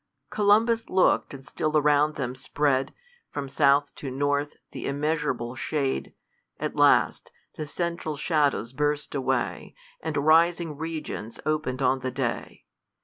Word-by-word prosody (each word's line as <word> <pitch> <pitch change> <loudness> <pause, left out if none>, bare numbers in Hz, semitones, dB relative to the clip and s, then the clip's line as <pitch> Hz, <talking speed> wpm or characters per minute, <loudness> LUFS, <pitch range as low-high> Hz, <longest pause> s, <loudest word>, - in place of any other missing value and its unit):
COLUMBUS 220 +3 +3
look'd; 185 0 +3
and 135 -1 -10
still 155 +3 -1
around 150 0 +3
them 125 -3 -3
spread, 135 0 0 0.4
From 145 -1 -4
south 140 +1 +3
to 140 - -5
north, 145 +2 -1 0.2
th' - - -9
immeasurable 145 -4 -1
shade; 135 0 -2 0.4
At - - -3
last, - - +3 0.2
the 155 - -5
central 170 -1 -3
shadows 145 -6 +1
burst 150 +1 -1
away, 130 -3 -2 0.3
And - - -3
rising 165 +2 +3
regions 155 -8 -5
open'd 150 -4 -1
on 130 0 +3
the 130 0 -3
day. 130 -2 -4
145 Hz, 130 wpm, -26 LUFS, 135-155 Hz, 0.4 s, COLUMBUS